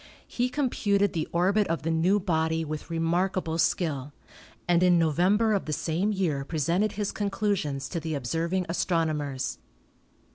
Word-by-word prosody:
He 245 +1 -1
com 265 -1 -1
puted 200 -2 +1
the 160 -2 -2
orbit 195 +4 +2
of 165 0 -2
the 165 - 0
new 175 +6 +3
body 160 -3 0
with 155 +1 -6
remarkable 170 +1 0
skill, 145 -6 0 0.5
and 175 -1 +3
in 180 -1 +5
November 185 +7 +3
of 200 - 0
the 155 - -3
same 175 +7 0
year 170 -9 -1
presented 170 +8 0
his 205 -1 -2
conclusions 195 -9 -1
to 170 - -3
the 160 -1 -3
observing 165 +7 -1
astronomers. 155 -6 -1
170 Hz, 150 wpm, -27 LUFS, 160-195 Hz, 0.5 s, in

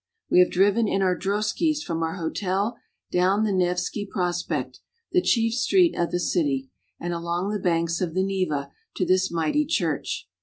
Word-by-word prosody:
We - - +6
have 180 - +6
driven 205 +4 +3
in 195 -1 +1
our 185 -1 +2
droskies 215 - 0
from 165 -1 -3
our 165 +1 -1
hotel 195 +5 -1 0.4
down 185 +4 +2
the 215 - +1
Nevski 180 +2 0
Prospekt, 175 -2 -2 0.3
the 360 - +3
chief 230 -8 +2
street 340 +8 +3
of 170 - 0
the 175 - -1
city, 140 -7 0 0.3
and 175 0 -3
along 170 +3 -2
the 210 - -2
banks 170 -1 0
of 170 -2 -2
the 185 - +2
Neva, 180 -8 -1 0.2
to 185 - 0
this 185 +1 +2
mighty 165 - +1
church. 310 +3 -2
185 Hz, 175 wpm, -25 LUFS, 170-205 Hz, 0.4 s, We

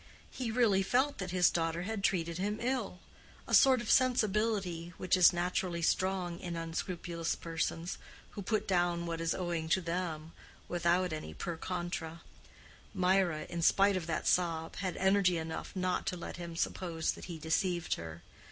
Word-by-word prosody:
He 250 -3 -3
really 220 -4 +3
felt 260 +8 +1
that 185 -1 -3
his 180 -1 +4
daughter 165 0 -1
had 210 0 -4
treated 170 -3 0
him 205 +2 -1
ill—a 235 -7 -5
sort 260 -2 +6
of 235 - -1
sensibility 210 -8 +1
which 185 0 +2
is 180 -1 +7
naturally 175 -1 -1
strong 180 -1 0
in 175 -2 -5
unscrupulous 165 0 -3
persons, 165 +1 -3 0.3
who 205 - -6
put 215 +2 -1
down 175 -2 +1
what 165 -1 -3
is 165 0 0
owing 170 -3 -2
to 190 - +4
them, 170 -3 -3 0.4
without 175 0 +1
any 80 - -6
per 170 - -4
contra. 175 -1 -4 0.7
Mirah, 180 -4 +2
in 170 - -4
spite 195 +4 +4
of 175 -3 -3
that 160 - -2
sob, 165 -2 +1
had 185 -2 -3
energy 190 -2 +3
enough 160 +3 -5
not 185 -1 -1
to 180 - -1
let 170 - -7
him 170 -1 -7
suppose 165 -1 -1
that - - -9
he 170 -2 -6
deceived 170 +2 0
her. 80 0 -7
175 Hz, 160 wpm, -32 LUFS, 165-190 Hz, 0.7 s, is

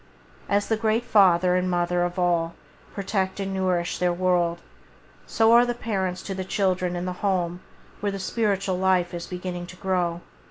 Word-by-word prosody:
As 200 0 +1
the 225 - +1
great 220 +1 +1
Father 180 -3 +4
and 180 0 +1
Mother 175 0 +1
of 175 +1 -1
all 170 -2 +1 0.4
protect 195 -1 -2
and 195 -1 -3
nourish 185 -2 0
their 180 -1 +2
world, 175 -1 +1 0.7
so 225 0 +3
are 235 +1 +7
the 240 0 -1
parents 190 -6 -2
to 195 - -4
the 190 0 -4
children 185 -2 0
in 175 +1 -3
the 180 - -2
home 180 -3 0 0.4
where 205 -1 -1
the 195 - -4
spiritual 195 -2 -1
life 185 -2 +2
is 170 0 -5
beginning 180 -1 -5
to 180 - -11
grow. 180 -2 -1
185 Hz, 175 wpm, -25 LUFS, 175-195 Hz, 0.7 s, are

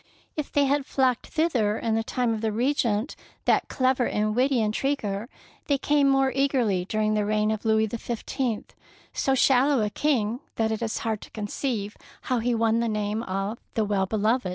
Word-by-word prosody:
If 300 -2 -4
they 285 -1 +3
had 280 0 +1
fiocked 255 -3 +1
thither 250 -11 +1
in 225 -1 -1
the 225 0 +1
time 240 0 0
of 220 - -3
the 220 -1 0
Regent, 235 0 0 0.3
that - - +3
clever 255 -2 +1
and 215 0 0
witty 260 +1 +2
intriguer, 220 -1 -1 0.4
they 280 - +2
came 290 0 +3
more 270 -1 +3
eagerly 250 -9 +1
dur 215 +3 -1
ing 215 0 +2
the 210 -1 +1
reign 215 +1 +1
of 220 +1 -4
Louis 220 0 +3
XV, 235 +1 -5 0.9
so 270 - +1
shallow 265 -1 +4
a 210 - -1
king 240 -6 0 0.2
that 220 -1 0
it 220 - -2
is 225 -1 -2
hard 220 -2 -1
to - - -11
conceive 210 0 -3 0.3
how 250 -2 0
he 240 +1 0
won 225 0 +2
the 235 0 0
name 210 0 -1
of 195 +1 -3
" - - -47
The 220 - +1
Well 200 -2 0
beloved." 220 +1 +1
225 Hz, 195 wpm, -26 LUFS, 215-265 Hz, 0.9 s, shallow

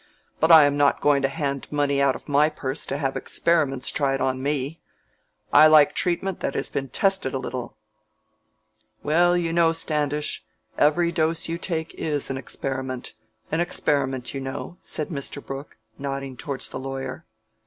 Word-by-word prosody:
But 160 +2 +4
I 160 -3 +10
am 145 0 +1
not 145 -1 +3
going 145 -1 +3
to 135 - +2
hand 140 -1 -3
money 145 -1 +1
out 135 -2 +3
of - - -11
my 145 +1 +4
purse 140 -2 -4
to 140 - -2
have 135 -2 -1
experiments 145 -6 +1
tried 135 -2 0
on 130 0 -1
me. 145 +2 -2 0.7
I 155 +2 +9
like 155 -2 +6
treatment 185 +2 0
that - - -3
has - - 0
been 135 -1 -3
tested 190 -4 +1
a - - +1
little." 125 -1 -6 1.3
"Well, 175 +4 +3
you 165 -1 -1
know, 165 -1 +4
Standish, 150 -5 -1 0.3
every 170 +3 +3
dose 165 0 0
you 165 +1 -3
take 160 -3 -3
is 145 -3 -2
an 135 - -3
experiment 130 -1 -4 0.4
an 160 - 0
experiment, 135 -7 0
you 135 - -4
know," 135 +6 -6
said 155 - -3
Mr. 140 -2 -4
Brooke, 135 +1 -8 0.2
nodding 135 -1 -4
towards 140 -1 -5
the - - -6
lawyer. 135 -1 -6
145 Hz, 165 wpm, -24 LUFS, 135-160 Hz, 1.3 s, I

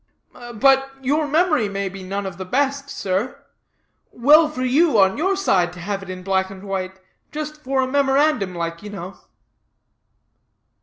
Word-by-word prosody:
"But 270 +3 +3
your 295 +3 +1
memory 305 - +2
may 200 0 -3
be 195 0 -8
none 195 +2 -4
of 190 -3 -6
the - - -3
best, 280 +6 -1
sir. 195 +4 -3 0.7
Well 300 +6 +5
for 255 -4 -4
you, 275 +1 +3
on 190 -1 +4
your 380 +6 0
side, 190 - +1
to 180 - -11
have 195 +3 -3
it 195 - -10
in 185 0 -7
black 190 0 0
and 190 0 -11
white, 190 -1 -4 0.3
just 305 0 -5
for 265 -1 0
a - - -1
memorandum 270 -7 +1
like, 170 0 -4
you 210 - -8
know." 195 -2 -8
215 Hz, 165 wpm, -21 LUFS, 190-285 Hz, 0.7 s, Well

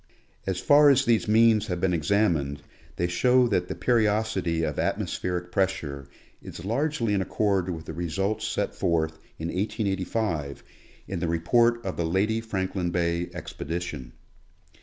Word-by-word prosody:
As 95 -2 -1
far 145 +6 +6
as 135 -1 +4
these 115 -2 +2
means 110 0 +4
have 90 -2 -2
been 90 0 +1
examined 80 -5 +1 0.3
they 85 - 0
show 125 +8 +3
that 90 -4 0
the - - -4
periodicity 105 -7 +1
of - - -2
atmospheric 90 -1 -2
pressure 80 -9 -1 0.3
is 85 - -9
largely 120 0 0
in 100 - +1
accord 95 -1 0
with 80 -3 -5
the - - -6
results 90 +6 -2
set - - -2
forth 80 -1 0 0.2
in 80 +1 -4
1885 95 - -2 0.4
in 95 - -3
The 85 - -1
Report 115 +9 +2
of 95 - -3
the 85 - 0
Lady 100 +7 +1
Franklin 95 -4 -2
Bay 85 0 -1
Expedition. 80 -6 -6
95 Hz, 145 wpm, -26 LUFS, 85-110 Hz, 0.4 s, far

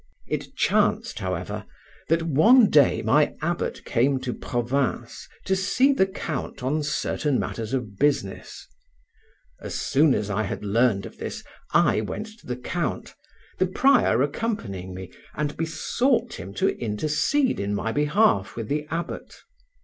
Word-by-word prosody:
It - - -4
chanced, - - +1
however, - - -3 0.5
that 165 +1 +2
one 210 - +5
day 145 -3 +4
my - - +3
abbot - - -3
came 130 +3 +2
to 125 -2 -3
Provins 125 +2 -2 0.2
to 190 - +2
see 255 +9 +3
the 190 -8 +3
count 155 -9 -5
on 150 +4 0
certain 145 -1 -1
matters 110 -2 -4
of 115 -7 -3
business. 145 +1 -1 0.9
As - - -6
soon 145 0 +3
as 105 0 -2
I 105 +2 0
had 105 0 -4
learned 105 -1 +2
of - - -11
this, - - -5 0.3
I - - +3
went 110 - -4
to - - -18
the 125 - -3
count, 125 - -3 0.5
the 185 - +3
prior 245 - +3
accompanying 115 - -3
me, 95 -1 -8 0.2
and 150 0 -2
besought 235 - 0
him 90 +3 -7
to - - +2
intercede 150 - +1
in 100 +1 -1
my 115 +2 -2
behalf 150 - +2
with 115 -2 -5
the 150 +1 -1
abbot. 170 +1 -5
140 Hz, 145 wpm, -25 LUFS, 115-175 Hz, 0.9 s, one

